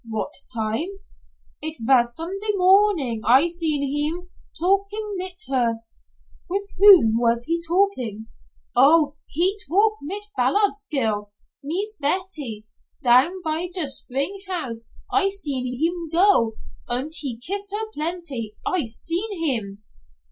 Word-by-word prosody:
"What 220 Hz, +6 st, -4 dB, 0.2 s
time?" 225 Hz, +6 st, -2 dB, 0.7 s
"It 315 Hz, +1 st, -4 dB
vas 240 Hz, 0 st, +3 dB
Sunday 390 Hz, -, -2 dB
morning 365 Hz, -, +3 dB
I 255 Hz, +7 st, +5 dB
seen 330 Hz, -4 st, +1 dB
heem, 300 Hz, +6 st, -2 dB, 0.3 s
talkin' 400 Hz, +4 st, 0 dB
mit 365 Hz, -1 st, -3 dB
her." 240 Hz, -4 st, 0 dB, 0.7 s
"With 400 Hz, +2 st, -2 dB
whom 370 Hz, -, +7 dB
was 235 Hz, 0 st, +1 dB
he 335 Hz, +1 st, -1 dB
talking?" 325 Hz, -, -1 dB, 0.5 s
"Oh, 290 Hz, +3 st, +5 dB
he 370 Hz, +7 st, +1 dB
talk 415 Hz, +6 st, +3 dB
mit 400 Hz, +8 st, -4 dB
Ballards' 410 Hz, 0 st, +1 dB
girl 215 Hz, -7 st, -1 dB, 0.3 s
Mees 395 Hz, +9 st, -2 dB
Betty. 290 Hz, -, -2 dB, 0.4 s
Down 270 Hz, +10 st, +3 dB
by 320 Hz, +2 st, 0 dB
der 355 Hz, -3 st, -2 dB
spring 275 Hz, +7 st, -2 dB
house 245 Hz, -11 st, -4 dB, 0.2 s
I 395 Hz, -1 st, +4 dB
seen 290 Hz, -10 st, -2 dB
heem 325 Hz, +6 st, -2 dB
go, 335 Hz, -, +4 dB, 0.3 s
und 260 Hz, +6 st, -2 dB
he 260 Hz, -6 st, -3 dB
kiss 395 Hz, -, -4 dB
her 430 Hz, +2 st, -2 dB
plenty 300 Hz, -9 st, -2 dB
I 360 Hz, -7 st, 0 dB
seen 335 Hz, -, -2 dB
heem." 220 Hz, -11 st, -2 dB
315 Hz, 125 wpm, -23 LUFS, 245-375 Hz, 0.7 s, whom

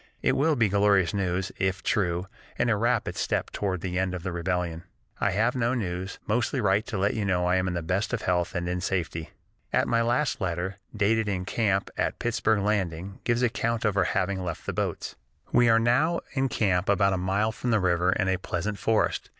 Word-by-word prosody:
It -, -, +4 dB
will 155 Hz, +2 st, +3 dB
be 115 Hz, -4 st, +3 dB
glorious 100 Hz, -2 st, +3 dB
news, 95 Hz, -1 st, -1 dB
if 95 Hz, -1 st, 0 dB
true, 90 Hz, -4 st, 0 dB, 0.3 s
and 120 Hz, -, +2 dB
a -, -, +3 dB
rapid 115 Hz, +1 st, 0 dB
step -, -, -1 dB
toward 95 Hz, -4 st, -2 dB
the 90 Hz, 0 st, -2 dB
end 95 Hz, -1 st, 0 dB
of 90 Hz, -, -6 dB
the 95 Hz, -, -3 dB
rebellion.... 85 Hz, -1 st, -2 dB, 0.4 s
"I -, -, +2 dB
have 110 Hz, +6 st, +1 dB
no 125 Hz, 0 st, +1 dB
news; 95 Hz, -4 st, -3 dB
mostly 120 Hz, +5 st, 0 dB
write 100 Hz, -1 st, +2 dB
to 110 Hz, -, -3 dB
let 100 Hz, +2 st, +1 dB
you 110 Hz, -, -2 dB
know 90 Hz, -3 st, +1 dB
I 90 Hz, +1 st, +3 dB
am 95 Hz, 0 st, 0 dB
in 90 Hz, -, -2 dB
the 85 Hz, -, -2 dB
best 95 Hz, +6 st, -1 dB
of 125 Hz, -3 st, -2 dB
health 90 Hz, -1 st, 0 dB
and 85 Hz, 0 st, -1 dB
in 90 Hz, 0 st, -2 dB
safety." 85 Hz, -4 st, -2 dB, 0.4 s
At -, -, +2 dB
last 120 Hz, +4 st, +1 dB
my 95 Hz, -, 0 dB
letter, 90 Hz, +3 st, -3 dB, 0.2 s
dated 110 Hz, +1 st, +2 dB
in 90 Hz, -2 st, -2 dB
camp 100 Hz, -3 st, 0 dB
at -, -, 0 dB
Pittsburg 110 Hz, -3 st, +1 dB
Landing, 95 Hz, -2 st, -1 dB
gives 120 Hz, +1 st, +1 dB
account 115 Hz, -1 st, 0 dB
of 105 Hz, -2 st, +1 dB
our 100 Hz, -3 st, +3 dB
having 95 Hz, +1 st, -1 dB
left 85 Hz, -3 st, -5 dB
the -, -, -3 dB
boats: -, -, -3 dB, 0.3 s
"We 120 Hz, -1 st, +5 dB
are 115 Hz, -, +6 dB
now 130 Hz, +9 st, +2 dB
in 135 Hz, -1 st, +1 dB
camp 95 Hz, -5 st, +1 dB
about 100 Hz, -1 st, +3 dB
a -, -, 0 dB
mile 100 Hz, +4 st, 0 dB
from 125 Hz, -, -4 dB
the 110 Hz, -2 st, +3 dB
river 90 Hz, -1 st, +2 dB
in 95 Hz, -, 0 dB
a 95 Hz, 0 st, +2 dB
pleasant 100 Hz, +3 st, -3 dB
forest. 110 Hz, -1 st, +1 dB
100 Hz, 215 wpm, -27 LUFS, 90-115 Hz, 0.4 s, are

